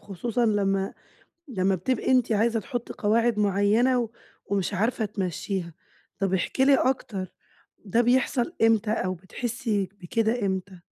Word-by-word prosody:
خصوصًا 230 Hz, +4 st, -1 dB
لمّا 195 Hz, -2 st, +1 dB, 0.6 s
لمّا 195 Hz, -5 st, +1 dB
بتبقي 225 Hz, +8 st, -1 dB
أنتِ 250 Hz, -3 st, +3 dB
عايزة 225 Hz, +1 st, +2 dB
تحُطّي 245 Hz, +1 st, -5 dB
قواعد 225 Hz, +1 st, +1 dB
معيَّنة، 215 Hz, +5 st, +2 dB, 0.4 s
ومش 200 Hz, 0 st, -1 dB
عارفة 220 Hz, +3 st, 0 dB
تمَشّيها. 190 Hz, -2 st, -3 dB, 0.5 s
طَب 195 Hz, 0 st, 0 dB
احكِي 190 Hz, +8 st, +1 dB
لي 275 Hz, 0 st, +6 dB
أكتر، 215 Hz, -9 st, -1 dB, 0.5 s
ده 215 Hz, +3 st, +1 dB
بيحصل 250 Hz, +4 st, +2 dB
إمتى؟ 225 Hz, -1 st, +3 dB
أو 185 Hz, -4 st, 0 dB
بتحسي 205 Hz, +1 st, -3 dB
بكده 220 Hz, +4 st, 0 dB
إمتى؟ 190 Hz, -1 st, -3 dB
210 Hz, 125 wpm, -26 LUFS, 195-240 Hz, 0.6 s, لي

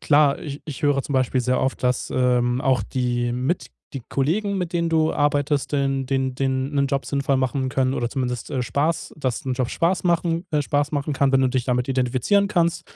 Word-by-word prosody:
klar, 145 Hz, -1 st, +4 dB
ich 145 Hz, -2 st, -7 dB
ich 150 Hz, -3 st, -7 dB
höre 145 Hz, -2 st, +2 dB
zum 140 Hz, -, -6 dB
Beispiel 130 Hz, 0 st, +1 dB
sehr 125 Hz, +1 st, +1 dB
oft, 135 Hz, -, -1 dB
dass, 125 Hz, 0 st, 0 dB
ähm, 125 Hz, 0 st, +2 dB
auch 130 Hz, -2 st, +2 dB
die 120 Hz, -1 st, -1 dB
mit 130 Hz, +8 st, -1 dB, 0.3 s
die 135 Hz, -4 st, -6 dB
Kollegen, 195 Hz, +9 st, 0 dB
mit 180 Hz, -1 st, -3 dB
denen 170 Hz, -1 st, 0 dB
du 160 Hz, -1 st, +2 dB
arbeitest, 145 Hz, 0 st, 0 dB
dann 135 Hz, -1 st, 0 dB
den 130 Hz, -1 st, -1 dB
den 135 Hz, +1 st, -1 dB
'nen 140 Hz, 0 st, +2 dB
Job 140 Hz, 0 st, -1 dB
sinnvoll 140 Hz, -1 st, 0 dB
machen 130 Hz, 0 st, 0 dB
können 130 Hz, 0 st, 0 dB
oder 120 Hz, 0 st, -2 dB
zumindest, 125 Hz, -2 st, -3 dB
äh, 135 Hz, -4 st, -1 dB
Spaß 150 Hz, +6 st, -1 dB
dass 130 Hz, -5 st, -2 dB
'n 130 Hz, -, 0 dB
Job 125 Hz, -1 st, -1 dB
Spaß 170 Hz, +1 st, +1 dB
machen 170 Hz, 0 st, +1 dB
äh, 150 Hz, -2 st, +1 dB
Spaß 145 Hz, +1 st, 0 dB
machen 145 Hz, 0 st, -1 dB
kann, 140 Hz, 0 st, +2 dB
wenn 135 Hz, -, +4 dB
du 130 Hz, -, +3 dB
dich 125 Hz, -1 st, -1 dB
damit 125 Hz, 0 st, 0 dB
identifizieren 130 Hz, -, +1 dB
kannst. 170 Hz, -4 st, +1 dB
135 Hz, 215 wpm, -23 LUFS, 130-150 Hz, 0.3 s, klar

